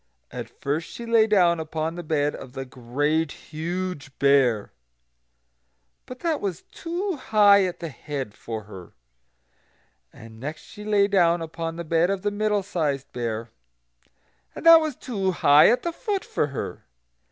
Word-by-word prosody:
And -, -, -6 dB
first 150 Hz, +4 st, -3 dB
she 235 Hz, -, -8 dB
lay 230 Hz, -1 st, +4 dB
down 175 Hz, -5 st, +4 dB
upon 160 Hz, 0 st, -3 dB
the 175 Hz, -, -6 dB
bed 150 Hz, -3 st, 0 dB
of 125 Hz, -, -10 dB
the 135 Hz, -1 st, -5 dB
Great 140 Hz, +5 st, -1 dB
Huge 165 Hz, -2 st, -5 dB
Bear; 135 Hz, -7 st, +3 dB, 1.4 s
but 255 Hz, 0 st, -9 dB
that 325 Hz, -3 st, 0 dB
was 190 Hz, -5 st, -3 dB
too 350 Hz, +1 st, -4 dB
high 205 Hz, -5 st, +5 dB
at 180 Hz, -, -5 dB
the 165 Hz, -, -4 dB
head 135 Hz, -4 st, -6 dB
for 110 Hz, 0 st, -6 dB
her. 95 Hz, -4 st, -12 dB, 1.2 s
And 110 Hz, 0 st, -13 dB
next 150 Hz, +6 st, -6 dB
she 210 Hz, -1 st, -12 dB
lay 205 Hz, -1 st, +3 dB
down 175 Hz, -4 st, +3 dB
upon 165 Hz, 0 st, -5 dB
the 170 Hz, -, -5 dB
bed 165 Hz, +2 st, +2 dB
of 195 Hz, -1 st, -2 dB
the 205 Hz, -, 0 dB
Middle 210 Hz, -1 st, 0 dB
sized 150 Hz, -8 st, -2 dB
Bear, 115 Hz, -1 st, -4 dB, 1.0 s
and -, -, -8 dB
that 330 Hz, -1 st, +9 dB
was 310 Hz, -4 st, -2 dB
too 195 Hz, -8 st, -2 dB
high 145 Hz, -3 st, +6 dB
at 240 Hz, -, +2 dB
the 340 Hz, -, -2 dB
foot 405 Hz, 0 st, -3 dB
for -, -, -1 dB
her. 140 Hz, -, -6 dB
165 Hz, 160 wpm, -24 LUFS, 140-205 Hz, 1.4 s, that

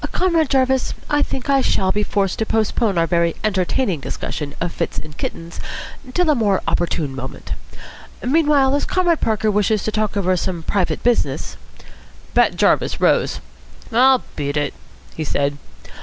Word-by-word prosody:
Comrade 335 Hz, -5 st, +2 dB
Jarvis, 265 Hz, -1 st, +2 dB, 0.2 s
I 290 Hz, 0 st, +3 dB
think 265 Hz, -2 st, -2 dB
I 275 Hz, -1 st, +4 dB
shall 190 Hz, -6 st, +1 dB
be 210 Hz, -, 0 dB
forced 200 Hz, -2 st, 0 dB
to 220 Hz, -, +1 dB
postpone 220 Hz, -2 st, +1 dB
our 165 Hz, -, +3 dB
very 170 Hz, -1 st, +1 dB
entertaining 195 Hz, -, 0 dB
discussion 145 Hz, +1 st, -5 dB
of 170 Hz, 0 st, -2 dB
fits 170 Hz, -, -3 dB
in 155 Hz, 0 st, -7 dB
kittens 165 Hz, +3 st, -6 dB, 0.6 s
till 355 Hz, -3 st, +3 dB
a -, -, +5 dB
more 210 Hz, -7 st, +1 dB
opportune 165 Hz, -5 st, 0 dB
moment. 130 Hz, 0 st, -7 dB, 0.7 s
Meanwhile, 285 Hz, -1 st, +3 dB
as 285 Hz, -, +1 dB
Comrade 350 Hz, -3 st, +1 dB
Parker 220 Hz, -1 st, +1 dB
wishes 210 Hz, 0 st, +1 dB
to 215 Hz, -, -1 dB
talk 215 Hz, -1 st, -1 dB
over 185 Hz, -2 st, +2 dB
some 175 Hz, -1 st, -3 dB
private 185 Hz, +1 st, -1 dB
business 240 Hz, -1 st, 0 dB, 0.4 s
" -, -, -24 dB
Bat -, -, +4 dB
Jarvis -, -, +2 dB
rose. -, -, +2 dB, 0.5 s
"I'll 255 Hz, +2 st, +5 dB
beat 145 Hz, 0 st, -2 dB
it," 145 Hz, -1 st, -1 dB, 0.4 s
he 160 Hz, -, -3 dB
said. 140 Hz, -1 st, -1 dB
210 Hz, 160 wpm, -20 LUFS, 170-265 Hz, 0.7 s, a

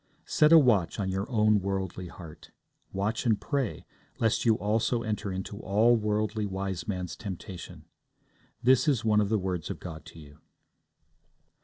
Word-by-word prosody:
Set 150 Hz, 0 st, +3 dB
a 165 Hz, -, +10 dB
watch 110 Hz, -, +3 dB
on 95 Hz, -2 st, -1 dB
your 95 Hz, +2 st, -3 dB
own 105 Hz, -3 st, +3 dB
worldly 95 Hz, -2 st, -3 dB
heart. 85 Hz, -3 st, -12 dB, 0.4 s
Watch 100 Hz, +3 st, -1 dB
and 110 Hz, -3 st, +3 dB
pray, 140 Hz, -7 st, -2 dB, 0.3 s
lest 115 Hz, 0 st, +1 dB
you 115 Hz, -2 st, +5 dB
also 110 Hz, +3 st, 0 dB
enter 105 Hz, -2 st, -3 dB
into 95 Hz, +2 st, -5 dB
all 110 Hz, +4 st, +3 dB
Worldly 105 Hz, 0 st, -1 dB
Wiseman's 95 Hz, -1 st, -4 dB
temptation. 95 Hz, -2 st, -8 dB, 0.8 s
This 130 Hz, +4 st, +4 dB
is 125 Hz, -6 st, +1 dB
one 105 Hz, -1 st, +4 dB
of 100 Hz, -, 0 dB
the 110 Hz, -, +2 dB
words 90 Hz, -4 st, -3 dB
of -, -, -5 dB
God 80 Hz, -4 st, -8 dB
to 85 Hz, -, -13 dB
you. 75 Hz, -2 st, -15 dB
105 Hz, 155 wpm, -28 LUFS, 95-115 Hz, 0.8 s, a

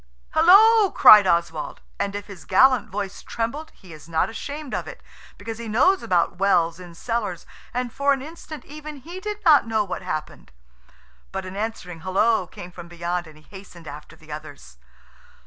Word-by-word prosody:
"Hallo!" 405 Hz, +6 st, +6 dB
cried 210 Hz, -, +8 dB
Oswald, 170 Hz, -3 st, -1 dB, 0.2 s
and 200 Hz, 0 st, -2 dB
if 205 Hz, -1 st, -5 dB
his 195 Hz, -4 st, -12 dB
gallant 255 Hz, +4 st, +4 dB
voice 200 Hz, 0 st, -5 dB
trembled 275 Hz, +8 st, -4 dB
he 180 Hz, -3 st, -14 dB
is 155 Hz, +1 st, -14 dB
not 160 Hz, +5 st, 0 dB
ashamed 285 Hz, +4 st, -7 dB
of -, -, -3 dB
it, -, -, -9 dB, 0.4 s
because 225 Hz, 0 st, -7 dB
he 235 Hz, -, -6 dB
knows 365 Hz, -, +3 dB
about 175 Hz, -1 st, 0 dB
wells 170 Hz, -3 st, +2 dB
in 175 Hz, -2 st, -12 dB
cellars, 205 Hz, -4 st, -3 dB, 0.3 s
and, 245 Hz, -1 st, -3 dB
for 280 Hz, 0 st, +1 dB
an 275 Hz, -, +1 dB
instant, 315 Hz, 0 st, -10 dB
even 305 Hz, 0 st, -9 dB
he 335 Hz, +7 st, -9 dB
did 420 Hz, +1 st, -6 dB
not 295 Hz, -7 st, +6 dB
know 220 Hz, -1 st, +1 dB
what 185 Hz, -3 st, -5 dB
happened. 155 Hz, -, -6 dB, 0.8 s
But 190 Hz, 0 st, -5 dB
an 185 Hz, +1 st, -8 dB
answering 200 Hz, -5 st, -5 dB
hullo 190 Hz, +3 st, +1 dB
came 180 Hz, -, -11 dB
from 175 Hz, -1 st, -11 dB
beyond, 175 Hz, 0 st, -4 dB
and 155 Hz, -1 st, -15 dB
he 155 Hz, -, -19 dB
hastened 185 Hz, -4 st, -12 dB
after 150 Hz, +3 st, -10 dB
the 155 Hz, -1 st, -16 dB
others. 150 Hz, -, -10 dB
200 Hz, 180 wpm, -23 LUFS, 170-275 Hz, 0.8 s, cried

